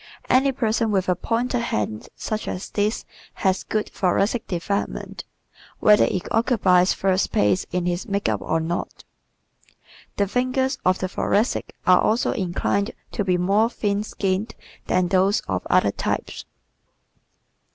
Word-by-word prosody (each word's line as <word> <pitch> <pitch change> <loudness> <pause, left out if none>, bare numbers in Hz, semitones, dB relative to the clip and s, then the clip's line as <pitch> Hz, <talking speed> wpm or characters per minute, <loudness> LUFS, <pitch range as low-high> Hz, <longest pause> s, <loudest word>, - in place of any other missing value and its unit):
Any 265 +2 +4
person 225 -3 0
with 190 -3 0
a 180 - +3
pointed 240 +5 -1
hand 105 - -3
such 215 0 -4
as 180 - -5
this 210 +2 -1 0.4
has 190 0 +3
good 215 -1 -2
thoracic 200 +5 0
development 195 +3 -3 0.5
whether 210 -1 +5
it 185 - -2
occupies 195 -6 +3
first 190 0 +1
place 105 -2 +2
in 180 -1 -1
his 180 +5 -2
makeup 195 - -1
or 160 - 0
not. 165 +2 -4 1.1
The 200 - +2
fingers 255 +4 0
of 185 +1 +3
the 185 - -2
Thoracic 205 +4 -1
are 180 0 +6
also 225 +3 +1
inclined 200 +2 -1 0.2
to 205 - -1
be 185 -2 +1
more 200 +5 +2
thin 205 -3 -1
skinned 200 +1 -2 0.3
than 180 -1 +1
those 190 +3 +3
of - - -4
other - - +4
types. - - -3
200 Hz, 140 wpm, -23 LUFS, 180-225 Hz, 1.1 s, are